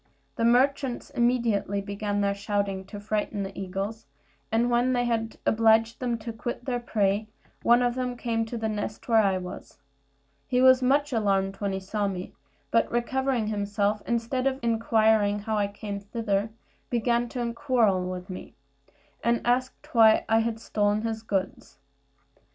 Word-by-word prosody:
The 230 - 0
merchants 265 +2 +2
immediately 235 -6 +1
began 205 +1 -2
their 200 0 +1
shouting 200 -1 -2
to 205 +1 -8
frighten 210 0 -2
the 195 0 -7
eagles; 195 +4 -5 0.4
and 235 +2 +2
when 245 +2 +2
they 245 -1 +1
had 225 -1 -1
obliged 225 +1 +3
them 240 -2 -1
to 225 +1 -6
quit 240 +2 -5
their 245 -2 -1
prey, 210 -2 0 0.3
one 240 +1 +4
of 245 0 +1
them 250 -1 -3
came 230 -1 -1
to 235 +2 -5
the 220 -1 -2
nest 210 0 -4
where 225 -2 +5
I 195 -2 +2
was. 180 -1 -8 0.7
He 250 - +1
was 260 0 +6
much 280 +2 +2
alarmed 195 -3 +1
when 200 -1 -2
he 190 - -2
saw 200 +2 -2
me; 185 -2 -5 0.4
but 230 - +2
recovering 255 0 0
himself, 205 0 -1
instead 235 +3 0
of 265 -1 0
inquiring 220 -2 +3
how 215 +1 -3
I 205 -1 +1
came 200 0 -6
thither, 205 0 -2 0.4
began 235 0 +1
to 240 -1 -3
quarrel 230 -9 +1
with 180 0 -6
me, 185 - -9 0.7
and 235 0 +1
asked 255 +2 -1
why 225 -2 +6
I 225 +1 +2
stole 205 -2 0
his 220 +1 -2
goods. 195 -3 -3
225 Hz, 160 wpm, -27 LUFS, 205-240 Hz, 0.7 s, was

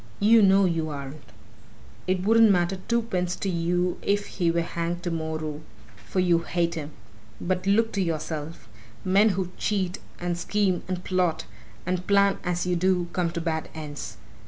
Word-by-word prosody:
You 225 +2 +6
know 195 0 +5
you 165 -3 0
aren't. 140 0 -7 0.9
It 185 0 0
wouldn't 225 +2 +6
matter 180 0 +2
twopence 215 -7 0
to - - -4
you 175 +1 0
if 205 0 0
he 175 -3 -1
were 170 0 +2
hanged 170 +1 -3
tomorrow, 160 -3 -3 0.5
for 190 - -1
you 175 -2 +4
hate 170 0 -1
him. 150 -3 -5 0.5
But 185 +1 -2
look 225 +3 +3
to 200 - 0
yourself! 160 -4 -4 0.4
Men 200 +4 +5
who 185 -2 -2
cheat, 195 -3 -1 0.2
and 175 -1 -2
scheme, 195 -2 +1
and 185 -1 -3
plot, 180 - 0 0.4
and 180 0 -2
plan 200 -1 +4
as 175 0 -1
you 180 0 +1
do 180 0 +1
come 180 -2 +1
to 170 0 -4
bad 160 -1 -2
ends. 145 -8 -7
180 Hz, 160 wpm, -26 LUFS, 165-190 Hz, 0.9 s, You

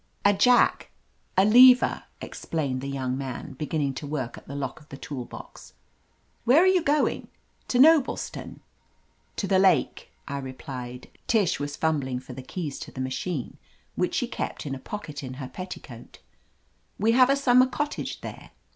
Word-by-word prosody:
"A 205 - +6
jack 245 +5 +3 0.2
— - - -41
a, 190 - +6
lever," 250 +4 +6 0.2
explained 140 -6 -3
the 140 - -5
young 130 -2 -2
man, 135 0 -6
beginning 145 0 -2
to 145 +2 -6
work 135 -5 -3
at - - -14
the 140 - -7
lock 140 -1 -4
of 150 - -21
the 140 - -9
tool 140 -4 -6
box. - - -12 0.7
"Where 275 +9 +5
are - - +4
you 375 -1 +4
going 300 -2 +1 0.2
— - - -40
to 245 - 0
Noblestown?" 300 +1 +3 0.7
"To - - -2
the 190 -1 +3
lake," 190 -4 +2 0.2
I 140 0 -3
replied. 130 -2 -7 0.2
Tish 210 -7 +2
was 145 0 -4
fum 160 -2 +1
bling 130 -2 -3
for 130 0 -11
the 130 - -7
keys 150 +1 -5
to - - -8
the - - -9
machine 130 +2 -3 0.4
which - - -1
she - - 0
kept - - -5
in 140 - -3
a 135 - -5
pocket 155 -5 -7
in 130 -2 -7
her 130 -1 -6
petticoat, 140 -9 -9 0.8
"We 220 +3 +2
have 255 +2 +5
a 275 - +4
summer 255 -2 +4
cottage 295 +3 -4
there." - - -9
150 Hz, 180 wpm, -26 LUFS, -, 0.8 s, A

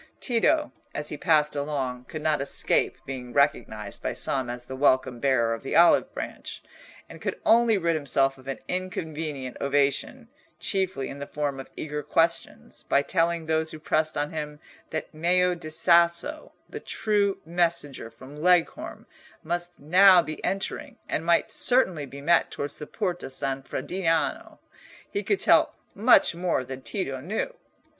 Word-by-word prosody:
Tito, 290 +5 +1 0.2
as 150 0 -3
he - - -4
passed 150 -2 +2
along, 135 -4 -3
could 155 +4 -7
not 155 -2 +1
escape 140 - +1
being 125 -2 -7
recognised 110 -7 0
by - - -2
some 130 -3 -1
as 120 0 -6
the 130 - -7
welcome 130 -2 +2
bearer 120 -4 +2
of 115 - -5
the 135 - -4
olive 170 +1 +5
branch, - - -7 0.4
and - - -12
could - - -3
only 230 -1 +5
rid 170 -2 +1
himself 135 -3 +1
of 130 - -17
an 135 - -3
inconvenient 160 -7 -4
ovation, 140 - 0 0.3
chiefly 190 -9 -1
in 140 - -8
the 140 - -6
form 145 -2 -3
of 135 - -9
eager 150 -1 -4
questions, 165 +3 -1
by 140 - +3
telling 165 +1 0
those 160 0 0
who 160 - -8
pressed 155 0 0
on 145 0 -1
him 150 -1 -5 0.3
that 155 - -5
Meo 180 +3 +2
di 170 -3 -7
Sasso, 170 - +2 0.2
the - - -7
true 205 -2 0
messenger 165 -7 -1
from 130 +4 -13
Leghorn, 175 +2 +1 0.4
must 175 +2 -3
now 180 +4 +6
be 155 -1 -7
entering, 195 0 -3
and 160 - -2
might 170 0 +2
certainly 185 - +2
be 140 +2 -10
met 170 +3 +3
towards 145 0 -5
the 150 - -7
Porta 180 -8 -3
San 135 0 -2
Frediano. 165 +3 -2 0.5
He 405 - -3
could 410 - 0
tell - - +4 0.2
much 225 0 +5
more 170 -5 -1
than 130 +1 -8
Tito 135 -4 -4
knew. 215 - -3
155 Hz, 160 wpm, -26 LUFS, 140-175 Hz, 0.5 s, now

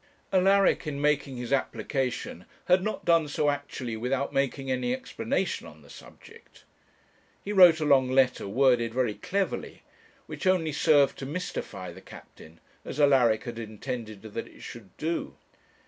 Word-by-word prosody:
Alaric 195 -2 +3
in 140 -2 -3
making 145 -2 0
his 125 +2 -3
application 130 - -2 0.2
had 180 +1 +4
not 215 +3 -4
done 165 -2 +3
so 145 0 +1
actually 140 -4 -5
without 130 +5 -2
making 135 0 -1
any 130 - 0
explanation 260 0 -3
on - - -15
the - - -16
subject. 460 +1 -16 0.8
He 205 - -4
wrote 180 -5 +7
a 155 - -1
long 135 -3 +4
letter, 130 -4 +2
worded 120 0 +2
very 125 -4 +1
cleverly, 195 - -3 0.4
which - - -5
only 175 -4 +2
served 145 -1 +3
to 135 - -5
mystify 140 - -5
the - - -13
captain, 80 +1 -14 0.2
as 145 - -7
Alaric 130 -6 +4
had 120 -1 -6
intended 110 -1 -6
that 110 +1 -6
it - - -16
should 115 -5 -10
do. 165 +2 -3
135 Hz, 150 wpm, -27 LUFS, 120-160 Hz, 0.8 s, wrote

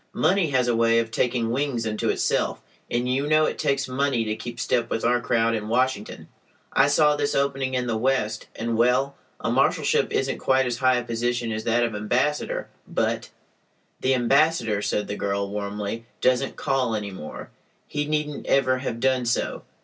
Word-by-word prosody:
Money 180 +1 +3
has 130 -3 +2
a 120 - +2
way 115 0 +3
of 115 -1 0
taking 120 -1 0
wings 130 -3 -1
unto 110 -1 -1
itself, - - 0 0.3
and 120 +1 0
you 135 +3 0
know 155 +1 +4
it - - -3
takes 140 -1 0
money 130 -2 0
to 110 0 -1
keep 120 +1 -7
step 120 0 0
with 115 - -2
our 120 0 +3
crowd 115 0 +1
in 105 -2 -3
Washington. 120 -2 -1 0.5
I 135 - +5
saw 150 +1 +4
this 145 -1 -1
opening 135 -1 0
in 125 -1 0
the 120 -2 -1
West, 110 -2 0
and—well, 125 +4 +1 0.2
a - - -1
marshalship - - +2
isn't 135 0 -1
quite 130 0 +2
as 120 0 -2
high 130 -1 +4
a 125 - -1
position 120 0 -1
as 110 0 -4
that 120 +1 +2
of 115 -2 -1
ambassador, 125 +8 -1 0.2
but—" - - -1 0.7
"The 130 0 +2
ambassador," 125 -4 +2
said 105 0 -1
the 105 - -3
girl, 100 0 -1
warmly, 105 +2 -4
"doesn't 130 +1 +1
call 130 -4 0
any 105 -2 -4
more. 75 -5 -8 0.4
He 145 0 -2
needn't 150 -1 -2
ever 130 -1 +3
have 115 -3 -4
done 130 0 +1
so. 120 - -1
125 Hz, 180 wpm, -24 LUFS, 115-135 Hz, 0.7 s, I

